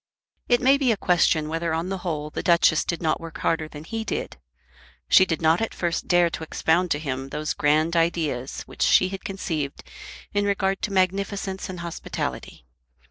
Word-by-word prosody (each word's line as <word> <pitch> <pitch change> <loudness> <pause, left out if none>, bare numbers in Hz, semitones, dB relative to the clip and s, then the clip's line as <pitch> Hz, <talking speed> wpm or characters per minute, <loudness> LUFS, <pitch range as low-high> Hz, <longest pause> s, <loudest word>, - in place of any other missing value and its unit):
It 245 0 +4
may 270 +2 +5
be 260 -4 +3
a 220 - 0
question 170 -4 +2
whether 165 +1 -1
on 165 +3 -2
the 195 -1 -3
whole 150 -4 -4
the - - -4
Duchess 170 -2 +4
did 170 0 -3
not 160 +1 +1
work 165 -1 -8
harder 160 -1 0
than 150 -1 -10
he 225 +7 -4
did. - - -4 0.7
She 185 - +6
did 160 -1 -2
not 160 +4 +4
at 225 - -2
first 170 -1 -2
dare 175 -2 +4
to - - -5
expound 165 +3 +1
to 145 - +1
him 135 -3 -4
those 150 +2 -2
grand 155 +3 +2
ideas 160 -6 -1
which - - -12
she 185 - +5
had 195 0 -7
conceived 160 -7 -4 0.5
in 205 0 +1
regard 195 -1 0
to 210 - -2
magnificence 195 +1 -1
and 180 -2 -6
hospitality. 170 - -5
170 Hz, 190 wpm, -24 LUFS, 155-190 Hz, 0.7 s, She